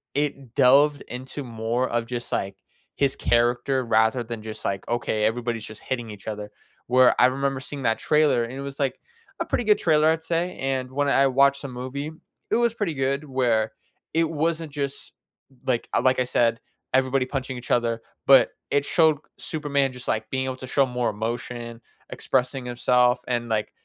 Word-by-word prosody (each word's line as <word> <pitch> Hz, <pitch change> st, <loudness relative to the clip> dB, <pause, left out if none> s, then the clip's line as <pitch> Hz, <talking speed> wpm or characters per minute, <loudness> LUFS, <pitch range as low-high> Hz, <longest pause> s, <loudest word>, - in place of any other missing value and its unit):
it 140 Hz, -4 st, -2 dB
delved 145 Hz, +3 st, +5 dB
into 130 Hz, +3 st, -6 dB
more 115 Hz, +1 st, -2 dB
of 120 Hz, -1 st, -1 dB
just, 120 Hz, 0 st, -5 dB
like, 95 Hz, 0 st, -2 dB, 0.4 s
his 140 Hz, -1 st, +1 dB
character 120 Hz, +2 st, +2 dB
rather 110 Hz, +2 st, +3 dB
than 115 Hz, -1 st, -7 dB
just, 110 Hz, -1 st, -7 dB
like, 100 Hz, 0 st, -3 dB
okay, 115 Hz, -2 st, 0 dB
everybody's 115 Hz, 0 st, -1 dB
just 110 Hz, -, -10 dB
hitting 120 Hz, -4 st, -4 dB
each 105 Hz, 0 st, -11 dB
other. 105 Hz, -1 st, -5 dB, 0.4 s
Where 125 Hz, +1 st, +5 dB
I -, -, +7 dB
remember 135 Hz, +1 st, 0 dB
seeing 135 Hz, 0 st, -7 dB
that 115 Hz, -1 st, +1 dB
trailer, 150 Hz, -6 st, +3 dB
and 115 Hz, -, -6 dB
it 135 Hz, -, -6 dB
was, 140 Hz, 0 st, -7 dB
like, 135 Hz, -2 st, -1 dB, 0.4 s
a -, -, 0 dB
pretty -, -, -1 dB
good 210 Hz, -2 st, +4 dB
trailer, 155 Hz, -1 st, +4 dB
I'd 160 Hz, 0 st, +1 dB
say. 170 Hz, +2 st, -1 dB
And 130 Hz, -1 st, -2 dB
when 145 Hz, +2 st, 0 dB
I 140 Hz, 0 st, +4 dB
watched 140 Hz, +1 st, +3 dB
the 140 Hz, -, -6 dB
movie, 130 Hz, +5 st, -5 dB, 0.4 s
it -, -, +4 dB
was 235 Hz, -1 st, +2 dB
pretty 205 Hz, -8 st, -2 dB
good 135 Hz, +2 st, -1 dB
where 120 Hz, -6 st, +1 dB, 0.4 s
it 165 Hz, 0 st, +2 dB
wasn't 160 Hz, 0 st, -1 dB
just, 140 Hz, -2 st, -5 dB, 0.5 s
like 125 Hz, -2 st, 0 dB, 0.2 s
like 130 Hz, 0 st, +3 dB
I 125 Hz, -, +2 dB
said, 115 Hz, -2 st, +2 dB, 0.3 s
everybody 130 Hz, 0 st, +2 dB
punching 130 Hz, 0 st, -4 dB
each 120 Hz, -, -8 dB
other. 115 Hz, -1 st, +1 dB, 0.3 s
But 135 Hz, -, +7 dB, 0.2 s
it 145 Hz, 0 st, +3 dB
showed 160 Hz, -4 st, +3 dB, 0.2 s
Superman 140 Hz, -4 st, -1 dB
just, 125 Hz, 0 st, -10 dB
like, 110 Hz, 0 st, -1 dB
being 130 Hz, 0 st, -1 dB
able 130 Hz, 0 st, -3 dB
to 130 Hz, -, -8 dB
show 135 Hz, +2 st, +3 dB
more 125 Hz, -3 st, -1 dB
emotion, 115 Hz, +2 st, -5 dB, 0.3 s
expressing 130 Hz, 0 st, -1 dB
himself. 125 Hz, 0 st, +3 dB
And, 120 Hz, -1 st, -1 dB
like, 110 Hz, -2 st, -1 dB
130 Hz, 185 wpm, -24 LUFS, 120-140 Hz, 0.5 s, I